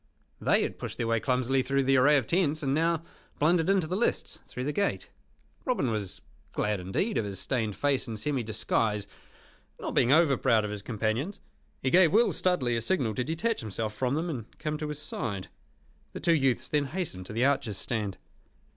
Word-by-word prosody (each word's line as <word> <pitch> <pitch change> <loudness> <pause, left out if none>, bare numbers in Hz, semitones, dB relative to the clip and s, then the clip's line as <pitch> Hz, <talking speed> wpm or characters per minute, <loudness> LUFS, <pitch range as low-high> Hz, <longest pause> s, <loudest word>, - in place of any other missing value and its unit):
They - - +3
had - - -4
pushed - - -5
their 120 - -1
way 115 0 +2
clumsily 130 +2 +1
through 135 +1 +1
the 135 +1 +3
array 145 +3 +6
of 130 - 0
tents, 155 - +1
and 135 -1 +1
now 165 +1 +1 0.3
blundered 165 +3 +3
into 195 -4 +3
the 175 +4 -2
lists 230 - -1
through 125 - -5
the 145 - -1
gate. 200 +4 -1 0.5
Robin 195 - 0
was 105 -4 -4 0.3
glad 105 -2 0
indeed 95 - -1
of 110 - -1
his 100 -1 -5
stained 110 -6 -1
face 140 -3 0
and 110 -2 -5
semi 140 +2 0
disguise, 110 -1 0 0.7
not - - -4
being 120 - +3
over 150 -3 +5
proud 110 -2 +3
of 105 - -4
his 105 -1 -5
companions. 115 - -2 0.4
He 130 - +1
gave 175 -3 +6
Will 235 +3 +4
Stuteley 140 -10 +1
a 115 - 0
signal 125 -7 0
to 125 - -1
detach 170 - -1
himself 110 0 -3
from 125 +5 0
them, 165 +3 -1
and 125 -9 -6
come 150 0 -3
to 155 - -3
his 150 -1 -4
side. 115 -10 -4 0.6
The - - -5
two 170 - +3
youths 135 -6 +2
then 145 -1 +1
hastened 140 - -4
to - - -7
the 120 +4 +2
archers' 120 -8 +1
stand. 105 -6 -3
135 Hz, 200 wpm, -28 LUFS, 110-160 Hz, 0.7 s, array